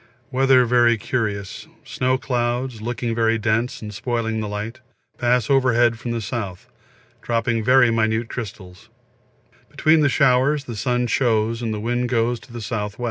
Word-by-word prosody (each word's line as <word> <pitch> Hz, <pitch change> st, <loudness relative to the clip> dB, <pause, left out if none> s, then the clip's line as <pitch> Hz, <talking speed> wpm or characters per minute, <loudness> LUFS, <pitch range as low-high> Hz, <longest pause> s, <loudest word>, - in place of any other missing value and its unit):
Weather 130 Hz, -1 st, +4 dB
very 120 Hz, -1 st, +3 dB
curious, 105 Hz, -3 st, -3 dB, 0.2 s
snow 130 Hz, 0 st, 0 dB
clouds, 120 Hz, -2 st, -2 dB
looking 120 Hz, 0 st, -3 dB
very 115 Hz, 0 st, +2 dB
dense 110 Hz, +2 st, -1 dB
and 105 Hz, 0 st, -7 dB
spoiling 115 Hz, -1 st, -2 dB
the 110 Hz, -, -3 dB
light, 105 Hz, +4 st, -5 dB, 0.4 s
pass 125 Hz, 0 st, +2 dB
overhead 120 Hz, -4 st, +3 dB
from 120 Hz, -, -6 dB
the 120 Hz, -, -1 dB, 0.2 s
S., 100 Hz, -6 st, -4 dB, 0.6 s
dropping 115 Hz, -1 st, -1 dB
very 125 Hz, 0 st, +5 dB
minute 110 Hz, 0 st, 0 dB
crystals; 95 Hz, -7 st, -8 dB, 0.8 s
between 155 Hz, -1 st, +3 dB
showers 135 Hz, +1 st, +3 dB
the 120 Hz, -4 st, -7 dB
sun 125 Hz, +2 st, 0 dB
shows 115 Hz, -1 st, +1 dB
and 115 Hz, -2 st, -2 dB
the 105 Hz, -, -3 dB
wind 120 Hz, +2 st, -1 dB
goes 120 Hz, 0 st, 0 dB
to 125 Hz, -, -17 dB
the 120 Hz, -, -8 dB
S.W. 105 Hz, -2 st, -4 dB
120 Hz, 150 wpm, -22 LUFS, 110-125 Hz, 0.8 s, very